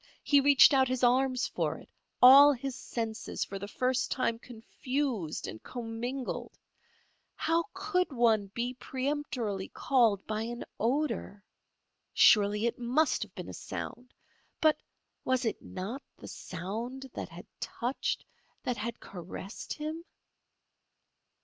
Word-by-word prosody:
He 285 -1 +5
reached 280 0 +7
out 265 -1 +4
his 255 0 -2
arms 255 +1 +3
for - - -2
it, - - -14 0.4
all 275 +3 +10
his 270 0 -5
senses 225 -2 -4
for 195 - -6
the 200 - -6 0.4
time 230 -3 0
confused 240 - -3
and 110 - -8
commingled. 245 +2 -5 0.8
How 330 +1 +1
could 375 -3 -1
one 225 -5 +3
be 235 +5 -3
peremptorily 260 -7 -3
called 230 -7 +2
by 215 0 -2
an 235 +2 -5
odour? 240 -4 -1 0.7
Surely 210 +1 +5
it 235 - -1
must 255 +6 +2
have - - -6
been - - -7
a - - -7
sound. 245 0 -7 0.5
But, 310 -1 +4 0.4
was 260 -1 +1
it 225 - -2
not 210 +9 -6 0.2
the - - -11
sound 225 +9 -6
that - - -5
had - - -11
touched, 245 +3 -2 0.4
that 250 -2 -1
had 230 +2 -4
caressed 185 +3 -8
him? 310 +2 -5
245 Hz, 125 wpm, -30 LUFS, 220-270 Hz, 0.8 s, all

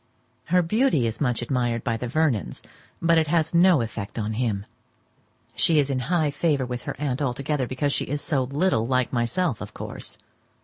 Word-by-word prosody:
Her 180 +1 +3
beauty 215 - +2
is 115 +4 -3
much 125 -4 0
admired 120 -2 -1
by 115 - 0
the 125 +2 -4
Vernons, 135 -4 0 0.4
but 165 0 +5
it 160 - +1
has 160 +1 +1
no 170 -4 +5
effect 110 -2 -5
on 110 -1 -2
him. 110 -4 -1 0.9
She 165 - +3
is 140 -2 +2
in 130 - 0
high 160 -5 +2
favour 145 -3 +1
with 125 -1 -4
her - - -3
aunt 140 -2 -1
altogether, 140 0 -1
because 140 +3 -1
she - - -1
is 145 +2 -2
so 145 -3 0
little 140 -4 +1
like 130 0 +1
myself, 125 - 0
of 105 - -8
course. - - -6
135 Hz, 185 wpm, -25 LUFS, 120-160 Hz, 0.9 s, but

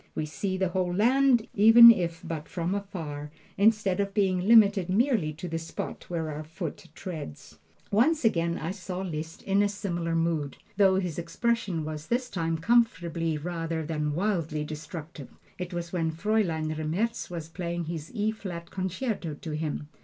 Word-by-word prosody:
We 155 - -1
see 190 +5 -3
the 190 -1 +1
whole 180 -1 0
land, 240 +4 +3
even 225 +3 +10
if 170 -6 -1
but 160 -2 -5
from 175 +1 -2
afar, 165 -8 -5 0.3
instead 205 -2 +3
of 200 -1 -1
being 190 -2 +1
limited 205 -5 +6
merely 215 - +2
to 165 +4 -7
the 165 -1 -3
spot 165 - -6
where 165 -3 -2
our 150 +1 -5
foot 160 +1 -7
treads. 155 - -8 0.3
Once 260 +7 +3
again 170 -5 +2
I 165 +3 -3
saw 185 -1 -5
Liszt 160 -3 -5
in 195 +1 +2
a 205 - +2
similar 175 -5 -2
mood, 165 -4 0 0.2
though 190 -1 +5
his 180 -4 -1
expression 180 -1 -1
was 155 0 -6
this 245 +1 -1
time 165 -3 -1
comfortably 170 -6 +1
rather 165 0 -3
than 150 -2 -2
wildly 165 -5 -1
destructive. 155 -1 -8 0.3
It 180 0 -4
was 175 0 -5
when 165 -3 0
Fraulein 165 -3 0
Remmertz 170 +10 -2
was 165 -3 -5
playing 170 0 -4
his 160 -1 -6
"E 215 0 +1
flat 180 -6 -7
concerto" 185 - -3
to 155 +2 -7
him. 150 -1 -3
175 Hz, 165 wpm, -28 LUFS, 160-200 Hz, 0.3 s, even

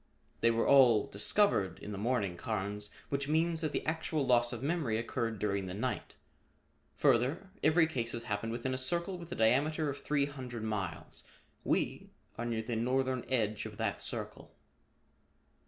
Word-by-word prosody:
"They 115 - +4
were 115 0 +2
all 125 -6 +6
discovered 105 - +2
in 105 - -8
the 100 - -4
morning, 105 -5 0
Carnes, 105 +1 -3 0.2
which 140 0 -1
means 160 +2 +2
that 155 -2 -1
the - - -2
actual 155 -2 -1
loss 120 -1 +4
of 120 0 -5
memory 145 -8 0
occurred 115 -1 -2
during 100 -1 -1
the 90 - -5
night. 125 +5 -3 0.8
Further, 145 +11 +2
every 160 +1 +5
case 120 -7 -2
has 115 - -4
happened 110 +1 -2
within 120 +3 -2
a 130 - -1
circle 170 +7 -2
with 170 -1 -10
a - - -2
diameter 145 +7 +2
of 140 - -8
three 145 -2 +1
hundred 130 -5 -6
miles. 100 -7 -4 0.4
We - - 0 0.3
are 120 - -4
near 115 -2 -1
the 115 +1 -3
northern 130 +2 0
edge 110 -4 0
of 105 -1 -11
that 105 -4 -1
circle." - - -4
120 Hz, 170 wpm, -32 LUFS, 110-145 Hz, 0.8 s, all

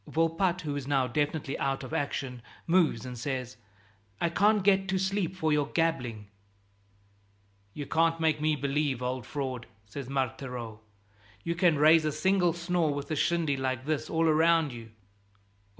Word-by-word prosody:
Volpatte, 165 +3 +1
who 150 -4 -3
is 140 -2 -5
now 135 -2 +2
definitely 145 +2 -1
out 135 0 -1
of 130 - -8
action, 135 -3 -3 0.2
moves 165 -9 +2
and 125 -2 -7
says, 125 -2 -4 0.6
"I 170 - +1
can't 205 +2 +3
get 195 -1 +3
to 190 0 0
sleep 190 -1 -1
for 160 -4 0
your 145 -1 +1
gabbling." 130 -11 -1 1.5
"You 145 - -5
can't 165 +2 +1
make 155 -2 +1
me 155 0 +2
believe, 140 -2 -1
old 125 -1 -3
fraud," 130 -4 -4 0.2
says 125 +6 -8
Marthereau, 125 -4 -3
"that 100 -2 -35 0.2
you 170 - -1
can 170 -2 +3
raise 155 +2 +6
a 155 - 0
single 175 +3 +2
snore 170 -2 0
with 145 +2 -5
a - - +1
shindy 160 -1 +1
like 130 -1 -2
this 155 -1 -2
all 165 0 +1
round 160 -2 +3
you." 115 -1 -9
150 Hz, 165 wpm, -29 LUFS, 130-165 Hz, 1.5 s, raise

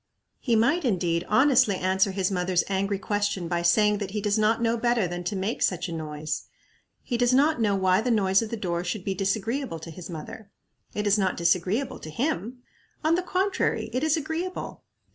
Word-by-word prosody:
He 235 -3 +1
might, 280 +11 +2
indeed, 175 -7 0
honestly 255 -2 +4
answer 190 +2 +1
his 190 0 -1
mother's 180 -1 +1
angry 195 +1 0
question 205 -3 -1
by 170 0 -1
saying 210 +4 +3
that 200 -2 -4
he 210 +2 -3
does 205 0 0
not 215 +1 +3
know 230 0 +1
better 235 -4 +1
than 175 +1 -5
to 200 - -2
make 195 +5 -2
such 180 0 +1
a - - -6
noise. 155 -1 -4 0.6
He 245 - -2
does 245 +1 +3
not 285 -1 +3
know 205 -2 +2
why 190 0 +3
the 250 - -1
noise 195 -4 +3
of 225 - -4
the 230 - -4
door 175 -4 -2
should 180 +2 -3
be 195 - 0
disagreeable 210 +3 -2
to 165 +1 -9
his 175 +3 -9
mother. 175 +5 -8 0.5
It 210 - -2
is 205 +1 +3
not 190 -2 0
disagreeable 180 +9 0
to 155 - -9
him. 245 - -3 0.4
On 315 +1 +3
the 350 - +2
contrary, 370 +2 -1
it 255 +3 -1
is 315 +1 +2
agreeable. 325 +5 -4
205 Hz, 200 wpm, -26 LUFS, 180-240 Hz, 0.6 s, honestly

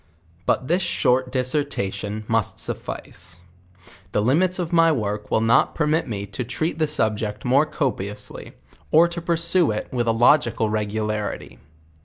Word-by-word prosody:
But 130 - +1
this 175 +5 +2
short 125 -5 +1
discretion 125 -6 -2
must 115 -3 0
suffice; 90 0 -7 0.7
the 105 - +2
limits 170 +10 +2
of 175 -2 -3
my 165 -1 +5
work 105 -6 -2
will 110 - +2
not 115 +1 +3
permit 155 0 +1
me 100 -4 -4
to 125 - -5
tre^.t 155 +7 -3
the 155 - +2
subject 110 -6 0
moie 135 +5 +4
copiously, 105 - -4 0.4
or 165 +2 +6
to 170 0 -5
pursue 170 0 +1
it 105 0 -3
with 120 -2 -1
a - - +4
logical 115 -1 +3
regularity. 105 0 -3
125 Hz, 145 wpm, -23 LUFS, 105-155 Hz, 0.7 s, or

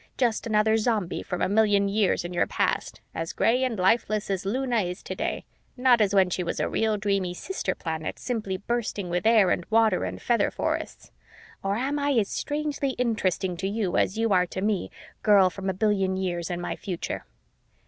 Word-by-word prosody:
Just 235 -3 +1
another 220 0 +3
Zombie 215 -5 0
from 180 - -3
a - - +3
billion 205 0 +3
years 200 -3 +1
in 175 - -5
your 175 - +1
past, - - -1
as 165 +1 -4
gray 250 +3 +2
and 250 -4 -1
lifeless 215 +2 +1
as 195 0 -2
Luna 250 +2 0
is 180 0 -5
today, - - -3 0.3
not 250 -2 +4
as 205 -1 +2
when 190 -2 +4
she 180 - -1
was 170 - -3
a - - +1
real 220 -1 0
dreamy 195 -3 -1
sister 385 - -3
planet 160 -2 -4
simply 215 -6 -3
bursting 205 -3 -3
with 180 +4 0
air 215 -5 +5
and 175 - 0
water 220 -3 +3
and - - -4
feather 240 -1 +2
forests. - - -4 0.5
Or 195 +1 -1
am 275 +6 -1
I 285 0 +1
as 220 -6 +2
strangely 290 -2 -2
interesting 190 -6 0
to 190 - -2
you 200 -3 -1
as 190 - +1
you 225 -2 +2
are 180 -1 +3
to 185 - -5
me, 205 -2 0 0.3
girl 200 -3 +5
from 195 +2 -4
a - - 0
billion 195 -2 +1
years 175 -3 -2
in 175 -1 -3
my 175 - -3
future?" 180 -4 -5
205 Hz, 195 wpm, -26 LUFS, 185-225 Hz, 0.5 s, air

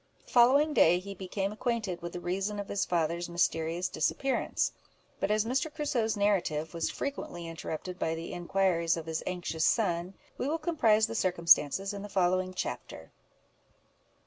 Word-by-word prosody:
The - - -17
following 275 +5 +5
day 175 - +5
he 200 +2 -6
became 195 +1 -3
acquainted 215 -5 -2
with 170 0 -6
the 180 - -4
reason 195 +4 -2
of 200 - -5
his 200 - 0
father's 170 0 -1
mysterious 170 0 0
disappearance; 260 - 0 0.5
but - - 0
as 215 +1 +2
Mr. 265 +6 0
Crusoe's 250 -8 -1
narrative 175 -7 0
was 165 -1 -1
frequently 175 -11 -5
interrupted 165 +2 -6
by 160 - 0
the 165 +1 -6
inquiries 175 -2 +1
of 165 - -5
his 160 -1 -3
anxious 175 -3 -2
son, 180 -3 +1 0.2
we - - -1
will 315 +3 0
comprise 230 -11 +3
the 225 - -5
circumstances 185 -1 +3
in 200 - -6
the 205 - -7
following 185 -1 +1
chapter. - - -5
185 Hz, 160 wpm, -30 LUFS, 170-215 Hz, 0.5 s, following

